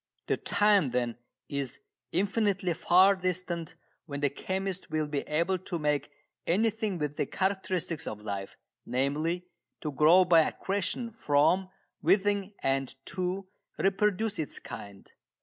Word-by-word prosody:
The -, -, +1 dB
time, 205 Hz, -6 st, +3 dB
then, 120 Hz, -1 st, -1 dB, 0.3 s
is 140 Hz, -3 st, -3 dB, 0.3 s
infinitely 195 Hz, -1 st, +1 dB
far 185 Hz, +3 st, +5 dB
distant 180 Hz, -3 st, -3 dB, 0.3 s
when 140 Hz, -2 st, -5 dB
the 145 Hz, -, +2 dB
chemist 190 Hz, +3 st, -3 dB
will 155 Hz, -1 st, 0 dB
be 145 Hz, -1 st, -1 dB
able 170 Hz, +5 st, +1 dB
to 180 Hz, 0 st, -4 dB
make 150 Hz, -2 st, 0 dB, 0.4 s
anything 215 Hz, +1 st, +1 dB
with 150 Hz, -2 st, -3 dB
the -, -, 0 dB
characteristics 185 Hz, -4 st, -1 dB
of 105 Hz, -1 st, -5 dB
life 100 Hz, -2 st, -5 dB, 0.3 s
namely, 150 Hz, +8 st, -1 dB, 0.4 s
to 150 Hz, -, -2 dB
grow 165 Hz, +6 st, +6 dB
by 170 Hz, -2 st, +7 dB
accretion 200 Hz, +7 st, -2 dB
from 180 Hz, 0 st, +2 dB, 0.3 s
within 200 Hz, 0 st, +2 dB
and 135 Hz, -1 st, 0 dB
to 185 Hz, +1 st, -2 dB, 0.3 s
reproduce 205 Hz, +1 st, +1 dB
its 155 Hz, -, -3 dB
kind. 100 Hz, -1 st, -9 dB
175 Hz, 130 wpm, -29 LUFS, 145-195 Hz, 0.4 s, by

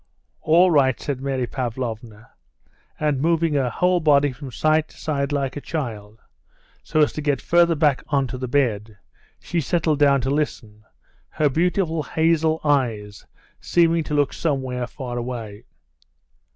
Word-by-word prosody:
"All 175 Hz, +3 st, +4 dB
right," 135 Hz, -5 st, +3 dB
said 135 Hz, -3 st, -4 dB
Mary 135 Hz, -2 st, -1 dB
Pavlovna, 115 Hz, -3 st, -5 dB, 0.7 s
and 150 Hz, -3 st, 0 dB
moving 165 Hz, 0 st, +1 dB
her 135 Hz, -3 st, +1 dB
whole 180 Hz, +8 st, +1 dB
body 145 Hz, -3 st, +3 dB
from 135 Hz, +2 st, -9 dB
side 155 Hz, +4 st, +1 dB
to -, -, -20 dB
side, 140 Hz, -2 st, -2 dB
like 140 Hz, -2 st, -2 dB
a 145 Hz, -, -5 dB
child, 110 Hz, -9 st, -6 dB, 0.6 s
so 155 Hz, -, 0 dB
as 150 Hz, -, +2 dB
to 155 Hz, -, -4 dB
get 145 Hz, -3 st, 0 dB
farther 170 Hz, -1 st, +3 dB
back 145 Hz, -3 st, +2 dB
on 140 Hz, -2 st, +1 dB
to 125 Hz, 0 st, -6 dB
the 130 Hz, -, -3 dB
bed, 110 Hz, -5 st, -1 dB, 0.4 s
she 170 Hz, -, -2 dB
settled 160 Hz, 0 st, 0 dB
down 140 Hz, -1 st, +4 dB
to 130 Hz, +2 st, -1 dB
listen, 110 Hz, -8 st, -3 dB, 0.5 s
her 150 Hz, -1 st, +1 dB
beautiful 165 Hz, +2 st, 0 dB
hazel 160 Hz, 0 st, +1 dB
eyes 115 Hz, -9 st, -1 dB, 0.3 s
seeming 170 Hz, -1 st, +2 dB
to 150 Hz, -, -3 dB
look 145 Hz, -2 st, +1 dB
somewhere 130 Hz, -5 st, -2 dB
far 125 Hz, -2 st, -6 dB
away. 115 Hz, -4 st, -6 dB
140 Hz, 150 wpm, -22 LUFS, 125-155 Hz, 0.7 s, All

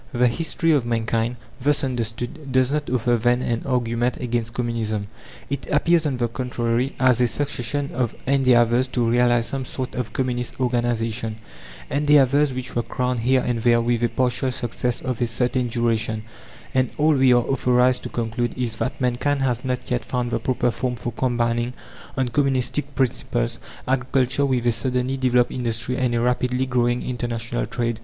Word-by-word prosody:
The 125 Hz, 0 st, +3 dB
history 165 Hz, +4 st, 0 dB
of 145 Hz, -5 st, +3 dB
mankind, 115 Hz, 0 st, -1 dB, 0.3 s
thus 145 Hz, +3 st, +2 dB
understood, 120 Hz, +2 st, -3 dB
does 130 Hz, 0 st, +3 dB
not 150 Hz, 0 st, -1 dB
offer, 120 Hz, -1 st, +2 dB
then, 120 Hz, +2 st, +2 dB
an 115 Hz, -1 st, -1 dB
argument 120 Hz, -1 st, 0 dB
against 120 Hz, -2 st, -2 dB
Communism. 115 Hz, -4 st, -1 dB, 0.4 s
It 140 Hz, -1 st, -4 dB
appears, 160 Hz, +2 st, +3 dB
on 135 Hz, -3 st, -1 dB
the 120 Hz, -1 st, +1 dB
contrary, 120 Hz, +1 st, -1 dB
as 125 Hz, -2 st, +4 dB
a 125 Hz, -, +4 dB
succession 140 Hz, +1 st, -2 dB
of 125 Hz, -3 st, -1 dB
endeavours 130 Hz, -2 st, +3 dB
to 120 Hz, -2 st, 0 dB
realize 120 Hz, 0 st, +3 dB
some 135 Hz, +1 st, -3 dB
sort 130 Hz, 0 st, -5 dB
of 120 Hz, -4 st, -3 dB
communist 125 Hz, -1 st, -2 dB
organization, 120 Hz, -2 st, 0 dB, 0.5 s
endeavours 145 Hz, -1 st, +4 dB
which 130 Hz, 0 st, -6 dB
were 120 Hz, -, +2 dB
crowned 125 Hz, +1 st, -2 dB
here 130 Hz, +3 st, +3 dB
and 120 Hz, -2 st, -1 dB
there 120 Hz, 0 st, +4 dB
with 120 Hz, 0 st, 0 dB
a 120 Hz, -, +3 dB
partial 125 Hz, +2 st, 0 dB
success 120 Hz, 0 st, -2 dB
of 130 Hz, -3 st, -3 dB
a 120 Hz, -, +2 dB
certain 125 Hz, +2 st, 0 dB
duration; 115 Hz, -2 st, 0 dB, 0.5 s
and 130 Hz, -1 st, +2 dB
all 155 Hz, +1 st, +4 dB
we 135 Hz, -2 st, +4 dB
are 120 Hz, -1 st, +5 dB
authorized 125 Hz, -1 st, +2 dB
to -, -, -6 dB
conclude 120 Hz, +1 st, -2 dB
is, 120 Hz, -3 st, -1 dB
that 135 Hz, +6 st, -3 dB
mankind 135 Hz, +2 st, 0 dB
has 125 Hz, -2 st, 0 dB
not 125 Hz, -1 st, -3 dB
yet 125 Hz, 0 st, 0 dB
found 125 Hz, -1 st, -2 dB
the -, -, 0 dB
proper 125 Hz, -1 st, 0 dB
form 125 Hz, +1 st, -2 dB
for 120 Hz, +1 st, -4 dB
combining, 120 Hz, 0 st, 0 dB, 0.4 s
on 130 Hz, -1 st, +1 dB
communistic 140 Hz, +2 st, 0 dB
principles, 120 Hz, -, -1 dB, 0.3 s
agriculture 130 Hz, +1 st, +1 dB
with 125 Hz, -3 st, 0 dB
a 120 Hz, -, +4 dB
suddenly 125 Hz, +2 st, 0 dB
developed 125 Hz, -2 st, +2 dB
industry 120 Hz, 0 st, -1 dB
and 125 Hz, -2 st, 0 dB
a -, -, +1 dB
rapidly 125 Hz, +1 st, +1 dB
growing 120 Hz, -1 st, +1 dB
international 120 Hz, -1 st, -3 dB
trade. 115 Hz, -2 st, -2 dB
125 Hz, 170 wpm, -23 LUFS, 120-130 Hz, 0.5 s, are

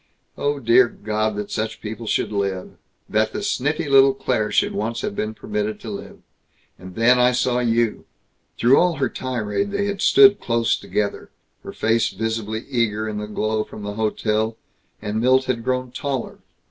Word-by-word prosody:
Oh, 145 Hz, 0 st, -1 dB
dear 120 Hz, 0 st, +5 dB
God, 110 Hz, -1 st, -2 dB
that 105 Hz, 0 st, -5 dB
such 110 Hz, 0 st, -3 dB
people 110 Hz, +1 st, -7 dB
should -, -, 0 dB
live... 100 Hz, -3 st, -2 dB, 0.4 s
that 110 Hz, +1 st, 0 dB
the 205 Hz, -, -4 dB
sniffy 150 Hz, -1 st, -1 dB
little 135 Hz, -1 st, +6 dB
Claire 125 Hz, -5 st, -1 dB
should -, -, +2 dB
once 115 Hz, +3 st, -2 dB
have 100 Hz, -, -3 dB
been 110 Hz, +1 st, -3 dB
permitted 105 Hz, 0 st, -3 dB
to -, -, -6 dB
live!... -, -, -8 dB, 0.6 s
And 90 Hz, 0 st, -11 dB
then 125 Hz, +2 st, +4 dB
I 125 Hz, 0 st, +4 dB
saw 125 Hz, 0 st, +1 dB
you!" 115 Hz, -2 st, 0 dB, 0.5 s
Through 125 Hz, +4 st, +5 dB
all 175 Hz, -1 st, +2 dB
her 140 Hz, -3 st, 0 dB
tirade 125 Hz, -, -2 dB
they 200 Hz, 0 st, -1 dB
had 200 Hz, -1 st, -3 dB
stood 205 Hz, 0 st, +6 dB
close 115 Hz, -1 st, +1 dB
together, 105 Hz, -1 st, -3 dB, 0.3 s
her -, -, -8 dB
face 115 Hz, 0 st, +1 dB
visibly 110 Hz, +1 st, -3 dB
eager 110 Hz, -4 st, 0 dB
in 105 Hz, -1 st, -4 dB
the 105 Hz, -, -5 dB
glow 110 Hz, +1 st, -1 dB
from 105 Hz, -, -10 dB
the 105 Hz, 0 st, -4 dB
hotel; 110 Hz, +1 st, -1 dB, 0.5 s
and 105 Hz, +2 st, -2 dB
Milt 130 Hz, +2 st, +4 dB
had 120 Hz, -3 st, -2 dB
grown 130 Hz, 0 st, -1 dB
taller. 135 Hz, -1 st, -4 dB
115 Hz, 175 wpm, -22 LUFS, 110-130 Hz, 0.6 s, little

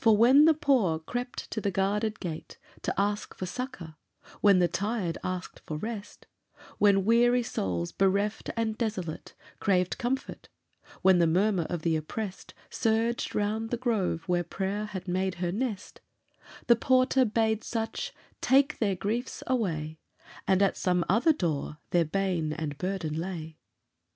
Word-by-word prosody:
For 220 Hz, -2 st, +6 dB
when 260 Hz, +7 st, +7 dB
the 320 Hz, -1 st, +6 dB
poor 255 Hz, -, +2 dB
crept 245 Hz, +10 st, -5 dB
to 220 Hz, -, -2 dB
the 200 Hz, -, 0 dB
guarded 205 Hz, +3 st, 0 dB
gate 160 Hz, -2 st, -6 dB, 0.2 s
To -, -, -1 dB
ask 205 Hz, +1 st, -1 dB
for 185 Hz, -, -4 dB
succour, 185 Hz, -, -6 dB, 0.4 s
when 200 Hz, -2 st, +6 dB
the 180 Hz, -1 st, +4 dB
tired 195 Hz, -1 st, -2 dB
asked 185 Hz, 0 st, -5 dB
rest, 205 Hz, +7 st, -5 dB, 0.5 s
When 195 Hz, -2 st, +4 dB
weary 240 Hz, +2 st, +4 dB
souls, 90 Hz, -, -2 dB
bereft 200 Hz, +2 st, +1 dB
and 225 Hz, -1 st, 0 dB
desolate, 200 Hz, -8 st, -4 dB, 0.2 s
Craved 185 Hz, -3 st, +1 dB
comfort, 260 Hz, +3 st, -3 dB, 0.5 s
when 190 Hz, -1 st, +6 dB
the 170 Hz, -, +4 dB
murmur 185 Hz, 0 st, +2 dB
of 175 Hz, -3 st, -3 dB
the 165 Hz, -1 st, +2 dB
oppressed 185 Hz, +6 st, -5 dB, 0.2 s
Surged 225 Hz, +1 st, 0 dB
round 215 Hz, +2 st, -1 dB
the 240 Hz, -, -1 dB
grove 215 Hz, -9 st, 0 dB
where 175 Hz, -1 st, +1 dB
prayer 195 Hz, +4 st, -3 dB
had 190 Hz, -3 st, -7 dB
made 185 Hz, +1 st, 0 dB
her 175 Hz, 0 st, -2 dB
nest, 215 Hz, -1 st, -4 dB, 0.6 s
The 235 Hz, -, +6 dB
porter 255 Hz, +2 st, +3 dB
bade 220 Hz, -1 st, +1 dB
such 225 Hz, -1 st, -3 dB, 0.3 s
take 275 Hz, +3 st, +3 dB
their 200 Hz, -4 st, +1 dB
griefs 220 Hz, +7 st, -3 dB
away, 160 Hz, -11 st, -1 dB, 0.5 s
And 190 Hz, +1 st, +4 dB
at 195 Hz, -, +1 dB
some 180 Hz, -2 st, +1 dB
other 230 Hz, -, +4 dB
door 155 Hz, -, -2 dB
their 170 Hz, -1 st, +3 dB
bane 170 Hz, -2 st, -1 dB
and 155 Hz, -2 st, -4 dB
burden 180 Hz, -4 st, -2 dB
lay. 165 Hz, -3 st, -6 dB
200 Hz, 150 wpm, -28 LUFS, 175-225 Hz, 0.6 s, when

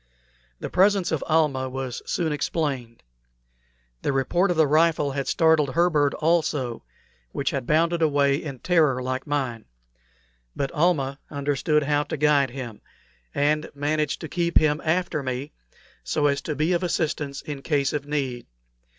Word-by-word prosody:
The -, -, -5 dB
presence 195 Hz, 0 st, +3 dB
of 160 Hz, -, -1 dB
Almah 145 Hz, -5 st, +2 dB
was 130 Hz, -1 st, -5 dB
soon 160 Hz, -3 st, 0 dB
explained. 135 Hz, -, -3 dB, 1.0 s
The -, -, 0 dB
report 175 Hz, +8 st, +1 dB
of 175 Hz, -, 0 dB
the 160 Hz, -, +5 dB
rifle 155 Hz, -1 st, +2 dB
had 135 Hz, 0 st, -3 dB
startled 160 Hz, -4 st, +3 dB
her 175 Hz, +1 st, +3 dB
bird 145 Hz, -3 st, +2 dB
also, 150 Hz, -7 st, 0 dB, 0.5 s
which -, -, -1 dB
had -, -, -3 dB
bounded 165 Hz, +2 st, +2 dB
away 140 Hz, -3 st, +3 dB
in 145 Hz, -4 st, -6 dB
terror 155 Hz, -4 st, +2 dB
like 130 Hz, +2 st, -3 dB
mine; 130 Hz, -6 st, -2 dB, 0.9 s
but 140 Hz, -, -2 dB
Almah 150 Hz, -5 st, +1 dB
understood 145 Hz, +1 st, 0 dB
how 145 Hz, 0 st, +1 dB
to -, -, -4 dB
guide 145 Hz, -2 st, +3 dB
him, 120 Hz, -4 st, -7 dB, 0.5 s
and 150 Hz, +2 st, +1 dB
managed 150 Hz, +1 st, -1 dB
to 160 Hz, -, -5 dB
keep 170 Hz, +1 st, +1 dB
him 155 Hz, 0 st, +2 dB
after 170 Hz, -1 st, 0 dB
me, 130 Hz, +2 st, -4 dB, 0.5 s
so 70 Hz, -, 0 dB
as 140 Hz, -1 st, +2 dB
to 155 Hz, -, -4 dB
be 155 Hz, +5 st, +1 dB
of 175 Hz, -, +1 dB
assistance 150 Hz, -5 st, -2 dB
in 145 Hz, -2 st, -6 dB
case 140 Hz, -2 st, 0 dB
of 145 Hz, -1 st, -3 dB
need. 135 Hz, -5 st, -3 dB
145 Hz, 155 wpm, -24 LUFS, 135-160 Hz, 1.0 s, the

